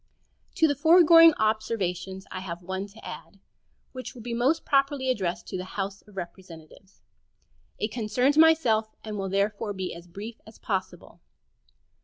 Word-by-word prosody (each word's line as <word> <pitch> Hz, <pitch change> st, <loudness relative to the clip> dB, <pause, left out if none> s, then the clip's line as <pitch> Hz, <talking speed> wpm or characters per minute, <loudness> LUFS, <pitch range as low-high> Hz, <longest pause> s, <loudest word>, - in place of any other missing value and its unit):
To 320 Hz, -, +4 dB
the 285 Hz, -, +1 dB
foregoing 330 Hz, +2 st, +7 dB
observations 195 Hz, -4 st, -2 dB
I -, -, -5 dB
have 175 Hz, -2 st, -7 dB
one 190 Hz, +2 st, -4 dB
to 210 Hz, +3 st, -15 dB
add, 195 Hz, -, -10 dB, 0.5 s
which 255 Hz, 0 st, -8 dB
will 235 Hz, -, -10 dB
be 240 Hz, 0 st, -4 dB
most 255 Hz, +7 st, +1 dB
properly 275 Hz, -1 st, +2 dB
addressed 185 Hz, -8 st, -3 dB
to -, -, -4 dB
the -, -, -4 dB
House 195 Hz, 0 st, -3 dB
of 205 Hz, -2 st, -17 dB
Representatives. 175 Hz, +1 st, -11 dB, 0.7 s
It 215 Hz, -, -2 dB
concerns 245 Hz, +5 st, +1 dB
myself, 300 Hz, -9 st, +4 dB
and 215 Hz, -1 st, -6 dB
will 195 Hz, -1 st, -3 dB
therefore 205 Hz, +2 st, -1 dB
be 190 Hz, -2 st, -4 dB
as 170 Hz, +1 st, -11 dB
brief 205 Hz, +6 st, -9 dB
as 220 Hz, -, -14 dB
possible. 190 Hz, -3 st, -5 dB
215 Hz, 155 wpm, -26 LUFS, 190-255 Hz, 0.7 s, foregoing